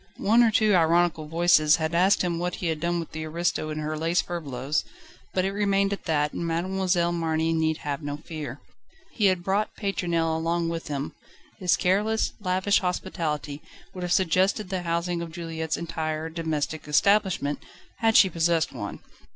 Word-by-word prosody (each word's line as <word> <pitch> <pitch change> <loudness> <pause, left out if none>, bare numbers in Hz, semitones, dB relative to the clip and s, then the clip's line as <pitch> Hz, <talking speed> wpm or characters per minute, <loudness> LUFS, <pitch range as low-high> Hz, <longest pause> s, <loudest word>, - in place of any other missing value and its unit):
One 225 +4 +4
or 235 - +5
two 215 -1 +3
ironical 170 -2 +3
voices 160 -2 +4
had 160 -1 -2
asked 185 +4 +4
him 170 -2 -1
what 175 0 -2
he - - -6
had 160 -1 -2
done 175 +2 0
with 165 - -6
the 160 0 -5
aristo 155 -1 -1
and 155 0 -4
her 155 +1 -3
lace 165 +3 +1
furbelows, 145 -4 -2 0.5
but 185 0 0
it 195 - 0
remained 200 -1 +1
at 200 - -7
that 150 -2 +1
and - - -3
Mademoiselle 175 +1 0
Marny 165 -1 0
need 160 -1 +1
have 145 0 -2
no 145 -1 -4
fear. 150 -4 -7 0.5
He 210 -4 +2
had 185 -2 +1
brought 200 +3 0
Pétronelle 170 -5 -1
along 165 +1 0
with 165 0 -4
him: 140 -1 -4 0.5
his 180 -5 +2
careless, 210 +4 +1
lavish 190 +1 +2
hospitality 160 -5 -3 0.3
would 185 - -7
have 180 -1 -3
suggested 185 +3 +2
the 190 -1 -2
housing 170 0 -1
of 170 -1 -6
Juliette's 160 -1 -3
entire 160 -1 -3
domestic 160 -2 -3
establishment, 185 -2 +2 0.4
had 225 -1 +4
she 195 - +7
possessed 165 -3 +1
one. 105 -6 -6
170 Hz, 175 wpm, -26 LUFS, 160-185 Hz, 0.5 s, she